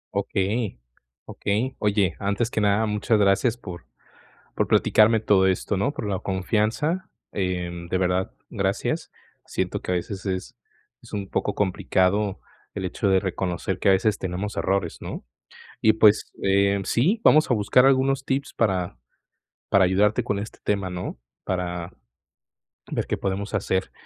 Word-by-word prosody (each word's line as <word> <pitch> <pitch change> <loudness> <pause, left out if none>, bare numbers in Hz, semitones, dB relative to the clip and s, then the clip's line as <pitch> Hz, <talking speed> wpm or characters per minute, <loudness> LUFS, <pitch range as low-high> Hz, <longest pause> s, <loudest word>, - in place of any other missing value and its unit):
Okey 100 - -1 0.5
okey, 115 +6 -2
oye, 100 -3 +1
antes 100 +4 -1
que 110 - 0
nada, 105 +2 +3
muchas 105 +1 +1
gracias 100 +4 +3
por 90 -7 -9 0.7
por - - 0
platicarme 110 +1 +4
todo 100 -3 +4
esto, 95 +2 0
¿no?, 115 +9 0
por 110 - -5
la 95 -2 -1
confianza, 110 - -1 0.2
eh, 90 -3 -2 0.2
de 95 - +1
verdad 90 0 0 0.2
gracias. - - -2 0.3
Siento - - -2
que - - -2
a - - +2
veces 95 +3 -5
es 95 -2 -4 0.5
es - - -15
un 100 -2 -4
poco 105 - -1
complicado 100 +1 +1 0.3
el 95 -2 -3
hecho 100 +3 -1
de 95 -1 +4
reconocer 95 0 -2
que 100 - +3
a - - +7
veces 100 +2 +2
tenemos 95 +3 -4
errores, 95 -3 -1
¿no? - - -6 0.6
Y, 110 - +5
pues 110 -1 +4
eh, 100 +1 +3
sí, 165 - +2
vamos 155 -2 +6
a - - +6
buscar 115 +4 +4
algunos 135 0 +3
tips 135 +1 -2
para 95 - 0 0.7
para 100 -1 +5
ayudarte 100 +3 +2
con 100 - -2
este 105 +2 -7
tema, 100 -3 -1
¿no? 90 -8 -5 0.3
Para, 90 -1 -3 1.0
ver - - -2
qué - - -1
podemos 100 +2 -3
hacer, 95 -1 -1
100 Hz, 150 wpm, -24 LUFS, 95-110 Hz, 1.0 s, a